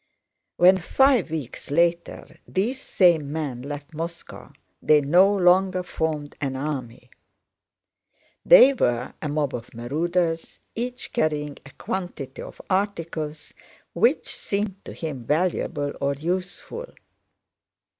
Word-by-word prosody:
When 185 +2 +6
five 255 +2 +3
weeks 150 -6 -6
later 170 +3 0
these 240 +8 -1
same 165 - +3
men 145 -6 -3
left 145 +3 -7
Moscow, 165 +2 -7 0.3
they 155 -1 +5
no 175 +8 +5
longer 185 -1 +3
formed 155 -4 -3
an 135 -2 -2
army. 130 -4 -5 1.3
They 390 - +8
were 120 - 0
a 150 - -3
mob 145 -2 -1
of 120 -1 -7
marauders, 165 +7 -1
each 245 +2 -5
carrying 150 -2 -1
a - - -13
quantity 165 -8 -5
of - - -10
articles 165 -6 -2 0.4
which 470 - +2
seemed 200 -1 -3
to - - -8
him 145 -7 -5
valuable 150 -1 -1
or 140 0 +1
useful. 185 - -4
165 Hz, 115 wpm, -24 LUFS, 145-185 Hz, 1.3 s, They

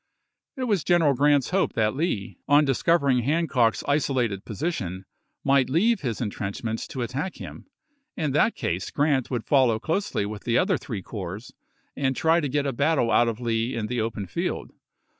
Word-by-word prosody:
It 260 - -2
was 205 - +1
General 165 -3 +3
G 130 - -7
rant's 145 -1 +3
hope 190 0 +1
that 110 0 +1
Lee, 110 - -2
on 145 +1 +5
discov 155 +5 +2
ering 130 -3 +2
Hancock's 140 -5 +1
isolated 130 -8 0
position, 100 - -4 0.4
might 135 -2 +3
leave 215 - +2
his 120 -6 -3
intrenchments 110 0 -4
to 130 - -4
attack 140 +10 -4
him; - - -10 0.5
in 155 -3 -1
that 150 - +2
case 90 +2 -2
Grant 145 -4 +1
would 120 -4 -3
follow 130 -6 +3
closely 160 - -1
with 105 0 -6
the 120 -1 +1
other 185 -4 +2
three 105 -7 -6
corps 100 +3 -7 0.4
and 135 -1 0
try 165 +4 +3
to 145 -4 -2
get 145 +1 0
a 135 - -1
battle 140 -2 +1
out 120 - +4
of 115 -1 -2
Lee 115 +1 -1
in 115 -2 -2
the 120 +1 -2
open 110 -2 -3
field. 90 - -3
130 Hz, 180 wpm, -25 LUFS, 115-150 Hz, 0.5 s, on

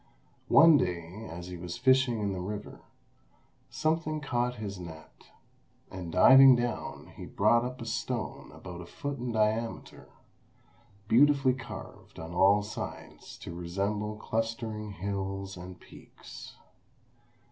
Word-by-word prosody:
One 165 -2 +7
day 90 -1 -3
as 85 +1 -7
he 90 0 -7
was 85 0 -6
fishing 130 -4 +3
in 100 -1 -1
the 95 - -4
river, 105 +3 -6 0.9
something 155 0 -1
caught 125 -4 -1
his 100 -4 -6
net, 80 -3 -11 0.7
and 90 -3 -6
diving 130 +9 +8
down 120 -1 -4
he - - -8
brought 115 +4 +3
up 125 +1 -5
a 115 - -6
stone - - -4
about 90 -1 -9
a 85 - -10
foot 140 +5 -5
in 120 0 -3
diameter, 110 +1 -2 1.0
beautifully 135 +2 +5
carved 130 -2 -10
on 80 +1 -7
all 100 +3 +4
sides 105 - -8
to - - -7
resemble 100 +5 -3
clustering 110 -1 -3
hills 95 +1 -4
and 90 0 -10
peaks. - - -13
105 Hz, 125 wpm, -29 LUFS, 90-125 Hz, 1.0 s, diving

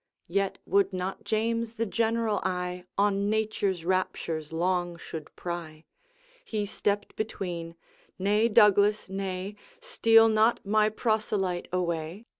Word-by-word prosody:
Yet 195 +2 0
would 200 -1 +2
not 185 +3 -4
James 230 +2 -1
the 230 0 -1
general 225 -1 0
eye 180 -1 -3
On 200 0 +2
nature's 210 -5 -1
raptures 170 -4 -1
long 175 +1 0
should 160 -2 -8
pry; 165 -3 -6 0.6
He 215 - -2
stepped 205 0 -2
between 175 -6 -4 0.2
' - - -33
Nay, 210 +3 +4
Douglas, 210 -1 +4
nay, 190 +1 -4 0.2
Steal 230 - +5
not 220 +1 +2
my 215 +1 +3
proselyte 210 -5 -1
away! 170 +2 -2
200 Hz, 120 wpm, -28 LUFS, 180-215 Hz, 0.6 s, Steal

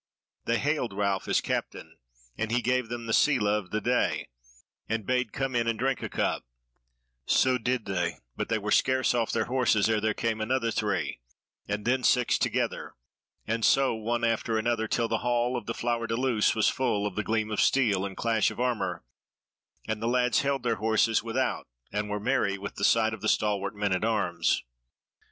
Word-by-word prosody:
They 115 - +1
hailed 140 -3 -1
Ralph 100 -2 0
as - - +2
captain, - - -4 0.4
and 115 0 -2
he 120 0 +1
gave 125 -1 0
them 120 -1 -5
the 115 - -2
sele 135 -5 +3
of 105 -3 0
the 105 - -1
day 125 +3 0 0.6
and 110 -2 -2
bade 125 -2 0
come 135 -2 -2
in 115 -1 +1
and 115 -1 0
drink 130 +2 0
a - - -4
cup; - - -1 0.8
so 130 -1 +3
did 125 0 -1
they, 90 -3 -2 0.2
but - - -3
they 115 - +2
were 105 0 -4
scarce 130 +2 +3
off 115 -2 0
their - - 0
horses 120 -5 +2
ere 110 -1 +1
there 110 0 0
came 110 -1 -1
another 115 +1 0
three, 105 - -1 0.5
and 105 0 -3
then 130 +2 +2
six 125 -1 +3
together, - - -1 0.5
and 115 +1 -2
so 135 +2 +4
one 115 +2 -2
after 115 -1 0
other 115 -2 0
till 115 +1 0
the 115 -1 -1
hall 120 +1 0
of 120 -4 -5
the 115 - -3
Flower 120 -1 -1
de 115 - -1
Luce 120 -3 +2
was 110 - +3
full 115 -6 0
of 100 -3 -3
the 105 - -1
gleam 110 0 -1
of 105 - +1
steel 110 -8 +3
and 95 -1 -5
clash 115 -2 +2
of - - -9
armour, 125 - -1 0.8
and 110 -1 -3
the 115 - -1
lads 125 -1 +2
held 140 -2 -1
their 115 -2 0
horses 110 0 +2
without 120 +3 -2 0.2
and 105 0 -2
were 105 0 -2
merry 100 -1 0
with 100 - -6
the 100 - -6
sight 110 +1 +3
of 110 - -7
the 110 - 0
stalwart 100 -1 0
men 100 -1 0
at 95 - -1
arms. 100 -7 +1
115 Hz, 200 wpm, -28 LUFS, 105-125 Hz, 0.8 s, so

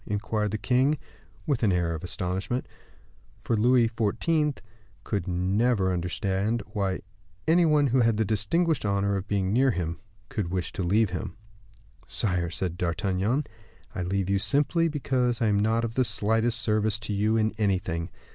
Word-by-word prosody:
inquired 105 +1 -1
the 110 - -2
king, 125 +8 +2 0.5
with 140 -5 0
an 105 -4 +3
air 85 -2 +1
of 80 - -6
astonishment; 95 +7 -3 0.8
for 115 - 0
Louis 120 +2 +4
XIV. 135 - 0 0.5
could 100 -4 -2
never 95 +3 +1
understand 95 +5 -1
why 95 -3 -1 0.5
any 170 +1 +5
one 150 -2 +4
who 130 -1 +2
had 115 -2 +2
the 110 - +1
distinguished 150 - +1
honor 100 -1 +1
of 95 +1 -4
being 95 -1 0
near 130 +3 +4
him 85 -6 -2 0.3
could 105 -10 -3
wish 90 -1 -3
to - - -3
leave 100 +3 +2
him. 90 0 -5 0.7
"Sire," 90 -5 0
said 90 +1 -2
D'Artagnan, 95 - 0 0.5
"I - - -3
leave 95 +1 -1
you 100 0 +1
simply 150 - +2
because 130 -5 0
I 115 - +1
am 105 -2 +2
not 110 +2 +1
of 115 - -4
the 130 - +2
slightest 110 +2 +1
service 110 -1 +1
to 105 0 -4
you 105 +3 +2
in 110 0 +2
anything. 90 -4 0
105 Hz, 165 wpm, -27 LUFS, 95-120 Hz, 0.8 s, any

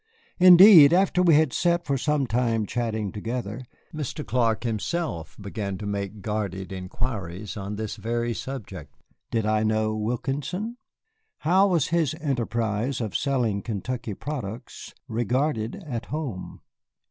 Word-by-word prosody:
Indeed, 180 -4 +9
after 180 0 +3
we 170 -4 +5
had 155 -3 +3
sat 175 0 +1
for 140 - 0
some 140 +1 +1
time 115 -2 0
chatting 110 -3 -2
together, 115 +2 -4 0.3
Mr. 150 0 -4
Clark 115 -3 +1
began 120 -1 -1
himself 110 - -3
to 100 0 -5
make 100 0 -4
guarded 100 -3 -3
inquiries 95 0 -5
on 100 0 -5
this 110 +1 -4
very 115 +2 -1
subject. 100 - -7 0.3
Did 115 -2 0
I 110 0 +2
know 110 0 +1
Wilkinson? 140 - -3 0.6
How 190 +5 +4
was 170 -7 +1
his 160 -3 +1
enterprise 120 -4 -1
of 110 -4 -4
selling 120 -7 0
Kentucky 115 0 -4
products 120 -6 -7
regarded 120 +1 -1
at 120 -6 -5
home? 140 -11 -5
115 Hz, 130 wpm, -25 LUFS, 105-145 Hz, 0.6 s, Indeed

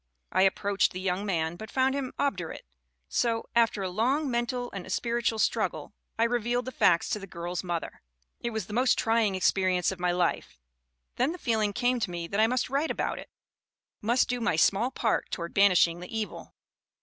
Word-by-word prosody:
I 185 - +2
approached 195 0 +2
the 185 - -5
young 190 +2 -1
man, 165 -2 -1
but 220 +3 -8
found 265 +1 +2
him 275 -2 -3
obdurate; 185 - -2 0.4
so, 230 - 0
after 225 -4 +3
a 185 - -2
long 260 +8 +1
mental 245 +1 -2
and 190 -1 -7
spiritual 235 +1 0
struggle, - - -1 0.2
I 225 - +3
revealed 240 +1 0
the 260 - -4
facts 170 -8 +3
to 210 - 0
the 195 - -9
girl's 175 0 -4
mother. 175 -2 -4 0.4
"It 235 - -2
was 220 -2 -3
the 210 - -9
most 250 +3 +3
trying 225 -3 +2
experience 185 -1 +2
of 190 - -7
my 180 0 +1
life. 175 - -1 0.6
Then 265 +6 +1
the - - -7
feeling 220 -8 0
came 245 +4 +1
to 215 - -1
me 170 -1 -4
that 200 - -1
I 220 - +5
must 250 +1 0
write 280 +5 0
about - - -2
it - - -10 0.7
must 240 +4 +2
do 245 -1 -2
my 230 -7 +1
small 200 +9 +3
part 235 -4 -1
toward 170 -1 -5
banishing 180 -4 +4
the 180 - -9
evil." 215 -1 -6
215 Hz, 195 wpm, -28 LUFS, 185-240 Hz, 0.7 s, I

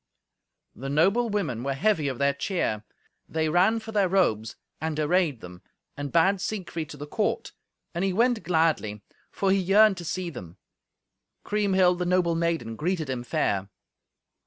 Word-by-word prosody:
The 135 +2 -6
noble 195 +11 +3
women 170 - -2
were 135 0 -1
heavy 160 -1 +1
of 130 -3 -3
their 140 +1 +2
cheer. 140 - -2 0.5
They 160 -1 0
ran 190 +8 +3
for 220 0 -9
their 200 -4 +2
robes, 110 - +1 0.3
and 155 -1 -2
arrayed 155 -5 +1
them, 90 0 -11 0.3
and 145 0 -5
bade 185 +3 +3
Siegfried 175 -7 -4
to 145 - -9
the 145 - -6
court; 150 - -2 0.4
and 170 - -2
he 195 - +1
went 235 +3 +2
gladly, 160 - 0 0.3
for 195 -1 0
he 195 - +3
yearned 195 +2 +5
to 175 - -6
see 180 +1 -3
them. 90 - -10 0.9
Kriemhild, 190 -4 +2
the 180 - -1
noble 180 -2 +2
maiden, 165 -9 -1
greeted 160 -1 -2
him 125 -2 -3
fair. 100 -5 -1
170 Hz, 160 wpm, -26 LUFS, 140-190 Hz, 0.9 s, yearned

